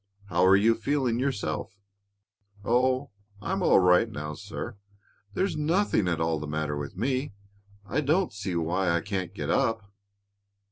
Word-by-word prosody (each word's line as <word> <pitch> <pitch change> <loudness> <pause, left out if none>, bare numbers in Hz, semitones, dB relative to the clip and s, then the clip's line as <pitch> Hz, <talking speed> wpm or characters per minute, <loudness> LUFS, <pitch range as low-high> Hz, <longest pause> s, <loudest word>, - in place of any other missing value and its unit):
How 90 0 +2
are 95 - +7
you 110 +3 +4
feeling 125 0 0
yourself?" 130 -6 -2 0.9
"Oh, 130 +4 +1 0.3
I'm 190 - -2
all 175 - +5
right 90 -1 +4
now, 75 +1 -5
sir. 90 - -7 0.6
There's 190 -2 0
nothing 155 - +1
at 85 -2 0
all 80 -1 0
the 75 - -6
matter 75 0 -2
with 75 +3 -6
me. 130 +3 -1 0.5
I 145 - -1
don't 160 - +1
see 100 -3 -4
why 90 +3 0
I 85 0 +2
can't 95 -2 -3
get - - -3
up." 110 -3 0
100 Hz, 150 wpm, -27 LUFS, 85-130 Hz, 0.9 s, are